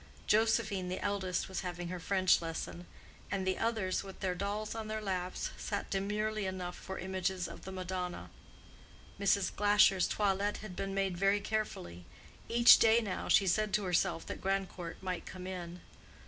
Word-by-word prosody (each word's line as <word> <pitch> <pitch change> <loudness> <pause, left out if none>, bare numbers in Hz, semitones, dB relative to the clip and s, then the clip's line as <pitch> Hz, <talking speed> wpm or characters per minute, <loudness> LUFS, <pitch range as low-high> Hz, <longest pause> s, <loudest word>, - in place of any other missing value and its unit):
Josephine, 205 -4 +2
the 185 - -3
eldest, 195 -3 -1
was 190 -2 -4
having 175 -1 -4
her 180 0 -4
French 185 0 +3
lesson; 170 +1 -5 0.4
and 195 -1 -1
the 185 0 0
others, 220 -5 0
with 195 -1 -10
their 185 -2 0
dolls 205 +3 -3
on 225 -1 -5
their 215 0 -2
laps, 185 -3 -3
sat 200 -1 -4
demurely 210 +1 -1
enough 180 -1 -4
for 190 - -7
images 185 -1 -2
of - - -10
the 190 - -6
Madonna. 180 - -4 0.9
Mrs. 200 -1 +2
Glasher's 205 -2 +5
toilet 205 0 0
had 205 -4 -8
been 195 +1 -3
made 195 -2 0
very 195 +1 +3
carefully—each 215 - +2
day 225 +1 +6
now 200 -5 -3
she 195 - +5
said 210 +3 +1
to 210 - 0
herself 175 -2 +1
that - - -6
Grandcourt 190 -3 -3
might 185 -2 -3
come 185 -1 -8
in. 180 -2 -6
190 Hz, 160 wpm, -33 LUFS, 180-205 Hz, 0.9 s, day